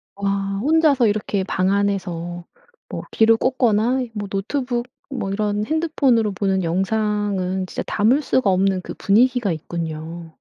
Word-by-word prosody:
와 195 Hz, 0 st, -1 dB
혼자서 290 Hz, -3 st, +4 dB
이렇게 205 Hz, -2 st, -1 dB
방 185 Hz, 0 st, 0 dB
안에서 175 Hz, -4 st, -2 dB, 0.4 s
뭐 -, -, -5 dB
귀로 225 Hz, 0 st, +4 dB
꽂거나 245 Hz, 0 st, +2 dB
뭐 205 Hz, -2 st, -4 dB
노트북 240 Hz, +5 st, -2 dB, 0.2 s
뭐 220 Hz, -8 st, -3 dB
이런 210 Hz, +1 st, -1 dB
핸드폰으로 275 Hz, -9 st, +1 dB
보는 190 Hz, -1 st, 0 dB
영상은 190 Hz, 0 st, -1 dB
진짜 -, -, -4 dB
담을 235 Hz, +8 st, +2 dB
수가 260 Hz, -6 st, +1 dB
없는 190 Hz, 0 st, +2 dB
그 -, -, -7 dB
분위기가 240 Hz, 0 st, +2 dB
있군요. 165 Hz, 0 st, -6 dB
205 Hz, 290 characters per minute, -21 LUFS, 190-240 Hz, 0.4 s, 혼자서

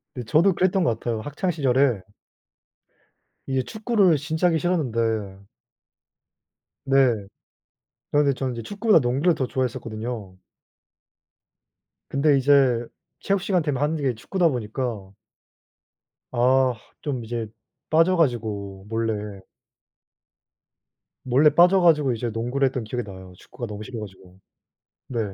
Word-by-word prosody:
네, 125 Hz, -, -5 dB
저도 165 Hz, -, +3 dB
그랬던 185 Hz, 0 st, +2 dB
것 115 Hz, -8 st, 0 dB
같아요. 115 Hz, -2 st, -3 dB
학창 145 Hz, -, -2 dB
시절에 135 Hz, -, +2 dB, 1.5 s
이 130 Hz, -1 st, 0 dB
축구를 215 Hz, -, +2 dB
진짜 160 Hz, +5 st, 0 dB
하기 165 Hz, -2 st, +2 dB
싫었는데 115 Hz, -, -1 dB, 1.4 s
네. 130 Hz, -7 st, +2 dB, 0.8 s
그런데 145 Hz, -1 st, +3 dB
저는 130 Hz, -1 st, -3 dB
이제 115 Hz, -, -5 dB
축구보다 205 Hz, -, +3 dB
농구를 135 Hz, +7 st, +1 dB
더 130 Hz, -, -1 dB
좋아했었거든요. 115 Hz, -5 st, -4 dB, 1.7 s
근데 140 Hz, 0 st, +3 dB
이제 130 Hz, -3 st, +3 dB, 0.3 s
체육 200 Hz, -1 st, 0 dB
시간 185 Hz, -3 st, +1 dB
되면 145 Hz, -3 st, -2 dB
하는 150 Hz, +2 st, +1 dB
게 135 Hz, -4 st, 0 dB
축구다 175 Hz, -, 0 dB
보니까 110 Hz, -4 st, -4 dB, 1.2 s
아 130 Hz, +1 st, +3 dB, 0.3 s
좀 130 Hz, -6 st, -3 dB
이제 115 Hz, -1 st, -4 dB, 0.4 s
빠져 165 Hz, +4 st, +4 dB
가지고 105 Hz, -, -1 dB
몰래 105 Hz, -3 st, -3 dB, 1.8 s
몰래 135 Hz, +4 st, +5 dB
빠져 180 Hz, +4 st, +6 dB
가지고 150 Hz, -6 st, +4 dB
이제 120 Hz, +1 st, -3 dB
농구를 120 Hz, +5 st, -1 dB
했던 130 Hz, -2 st, -3 dB
기억이 120 Hz, +3 st, -4 dB
나요. 95 Hz, -3 st, -11 dB
축구가 125 Hz, -2 st, -8 dB
너무 105 Hz, 0 st, -7 dB
싫어 115 Hz, +1 st, -7 dB
가지고. 95 Hz, -2 st, -12 dB, 0.7 s
네. 120 Hz, -, -3 dB
130 Hz, 260 characters per minute, -24 LUFS, 115-155 Hz, 1.8 s, 빠져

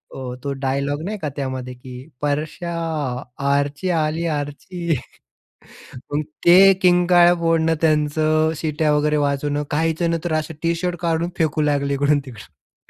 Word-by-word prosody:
अ, 125 Hz, -2 st, -6 dB
तो 140 Hz, -, -2 dB
डायलॉग 140 Hz, +2 st, -1 dB
नाही 210 Hz, +3 st, -4 dB
का 155 Hz, -, -3 dB
त्यामध्ये 130 Hz, -2 st, -4 dB
की, 125 Hz, +2 st, -11 dB
"परशा 155 Hz, +4 st, -2 dB, 0.8 s
आर्ची 145 Hz, +5 st, 0 dB
आली, 160 Hz, 0 st, 0 dB
आर्ची." 160 Hz, +3 st, -3 dB, 1.2 s
मग 150 Hz, -, +1 dB, 0.2 s
ते 190 Hz, +3 st, +8 dB
किंकाळ्या 175 Hz, -1 st, +5 dB
फोडणं 165 Hz, -1 st, +2 dB
त्यांचं, 155 Hz, 0 st, +2 dB
शिट्या 155 Hz, 0 st, 0 dB
वगैरे 150 Hz, +1 st, +1 dB
वाजवणं. 145 Hz, 0 st, 0 dB
काहीजण 160 Hz, +2 st, 0 dB
तर 175 Hz, +2 st, -5 dB
नंतर -, -, 0 dB
अ, 155 Hz, -, +1 dB, 0.2 s
टी-शर्ट 170 Hz, +1 st, 0 dB
काढून 170 Hz, 0 st, 0 dB
फेकू 155 Hz, -1 st, +1 dB
लागले 140 Hz, -1 st, +1 dB
इकडून-तिकडून 135 Hz, -, -3 dB
155 Hz, 130 wpm, -21 LUFS, 145-165 Hz, 1.2 s, ते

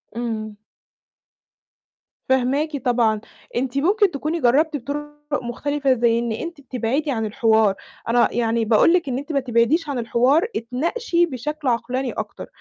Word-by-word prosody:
إمم. 220 Hz, -3 st, -4 dB, 1.7 s
فاهماكِ 275 Hz, +4 st, +1 dB
طبعًا. 230 Hz, -3 st, +2 dB, 0.3 s
أنتِ 255 Hz, +2 st, -1 dB
ممكن 390 Hz, +6 st, +3 dB
تكوني 310 Hz, +3 st, -2 dB
جرَّبتِ 295 Hz, +6 st, +3 dB
بطُرُق 290 Hz, +3 st, -5 dB, 0.3 s
مختلفة، 275 Hz, +3 st, 0 dB
زي 235 Hz, -1 st, +2 dB
إن 235 Hz, -1 st, -2 dB
أنتِ 320 Hz, +7 st, -5 dB
بتبعدي 265 Hz, +3 st, -2 dB
عن 225 Hz, -4 st, -1 dB
الحوار. 220 Hz, -2 st, +3 dB, 0.3 s
أنا 240 Hz, +1 st, +4 dB
يعني 230 Hz, -1 st, +1 dB
باقول 225 Hz, +9 st, +5 dB
لِك 340 Hz, -6 st, +1 dB
إن 250 Hz, -, -1 dB
أنتِ 285 Hz, +4 st, -5 dB
ما 280 Hz, -, +2 dB
تبعديش 260 Hz, +6 st, +1 dB
عن 270 Hz, -4 st, -2 dB
الحوار، 250 Hz, -, +2 dB
اتناقشي 340 Hz, -, 0 dB
بشكل 300 Hz, 0 st, -5 dB
عقلاني 250 Hz, +2 st, -1 dB
أكتر. -, -, -6 dB
260 Hz, 140 wpm, -22 LUFS, 235-295 Hz, 1.7 s, باقول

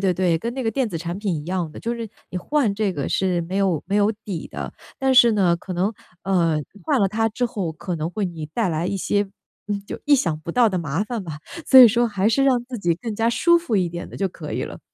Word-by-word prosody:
对 190 Hz, -2 st, +2 dB
对。 175 Hz, -3 st, +2 dB
跟 235 Hz, +6 st, -4 dB
那 265 Hz, -, -3 dB
个 225 Hz, -, +1 dB
电 250 Hz, 0 st, 0 dB
子 165 Hz, -4 st, -4 dB
产 170 Hz, +2 st, -4 dB
品 200 Hz, -3 st, -2 dB
一 150 Hz, -2 st, -3 dB
样 175 Hz, -2 st, -2 dB
的， -, -, -10 dB
就 235 Hz, +1 st, -2 dB
是 230 Hz, -1 st, -5 dB, 0.2 s
你 -, -, -5 dB
换 245 Hz, -2 st, +1 dB
这 205 Hz, -2 st, 0 dB
个 140 Hz, -5 st, -3 dB
是 185 Hz, -2 st, +1 dB
没 185 Hz, +4 st, -4 dB
有 190 Hz, -6 st, +1 dB
没 195 Hz, -, -2 dB
有 205 Hz, +1 st, +4 dB
底 180 Hz, -6 st, -5 dB
的， -, -, -6 dB, 0.3 s
但 265 Hz, -1 st, +2 dB
是 240 Hz, -2 st, +8 dB
呢， 180 Hz, -5 st, +3 dB
可 185 Hz, -, -7 dB
能， 190 Hz, +5 st, 0 dB, 0.3 s
呃， 170 Hz, -5 st, +2 dB, 0.2 s
换 290 Hz, -6 st, +1 dB
了 195 Hz, -, +4 dB
它 225 Hz, +3 st, 0 dB
之 240 Hz, +3 st, -1 dB
后 190 Hz, -7 st, -3 dB
可 175 Hz, +3 st, -5 dB
能 160 Hz, +1 st, -3 dB
会 205 Hz, +3 st, -2 dB
你 165 Hz, -4 st, -5 dB
带 205 Hz, +5 st, -1 dB
来 160 Hz, +1 st, -1 dB
一 195 Hz, -, -1 dB
些， 205 Hz, +2 st, +1 dB, 0.5 s
嗯， 205 Hz, -1 st, -1 dB
就 -, -, -6 dB
意 290 Hz, -, +6 dB
想 165 Hz, -, 0 dB
不 170 Hz, -, -5 dB
到 235 Hz, +5 st, +4 dB
的 190 Hz, -, -2 dB
麻 165 Hz, +4 st, -1 dB
烦 230 Hz, -2 st, -4 dB
吧。 155 Hz, -4 st, -7 dB, 0.3 s
所 265 Hz, -, +7 dB
以 250 Hz, -, +12 dB
说 235 Hz, +2 st, +2 dB
还 205 Hz, -1 st, +1 dB
是 250 Hz, +5 st, +2 dB
让 255 Hz, -3 st, +3 dB
自 245 Hz, 0 st, -6 dB
己 175 Hz, -4 st, +1 dB
更 225 Hz, +1 st, -5 dB
加 225 Hz, +2 st, +1 dB
舒 340 Hz, +8 st, +4 dB
服 290 Hz, -11 st, 0 dB
一 180 Hz, -2 st, +1 dB
点 170 Hz, +1 st, -6 dB
的 -, -, -9 dB
就 195 Hz, -, 0 dB
可 165 Hz, -4 st, -8 dB
以 -, -, -2 dB
了。 -, -, -8 dB
195 Hz, 295 characters per minute, -22 LUFS, 175-230 Hz, 0.5 s, 以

